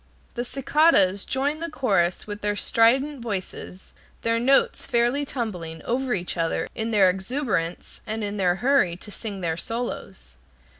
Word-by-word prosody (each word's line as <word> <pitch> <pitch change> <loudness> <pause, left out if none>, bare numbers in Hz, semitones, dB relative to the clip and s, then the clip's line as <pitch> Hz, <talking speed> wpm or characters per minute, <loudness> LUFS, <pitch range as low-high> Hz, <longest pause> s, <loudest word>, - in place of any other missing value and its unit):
The 240 - -2
cicadas 255 - +3
join 285 +3 -1
the 335 0 -3
chorus 195 - +1
with 205 0 -7
their 205 0 0
strident 260 +6 +2
voices, 190 -3 -6 0.3
their 230 0 +2
notes 270 +3 +2
fairly 245 +3 +2
tumbling 180 - -5
over 255 0 0
each 180 -1 -3
other 165 -1 0
in 220 0 -3
their 205 -4 +5
exuberance, 190 - -2
and 220 0 -2
in 205 0 -3
their 180 -3 +2
hurry 240 -6 +2
to 210 - -11
sing 205 -2 -6
their 165 -2 -1
solos. 175 - -5
220 Hz, 150 wpm, -24 LUFS, 185-260 Hz, 0.3 s, their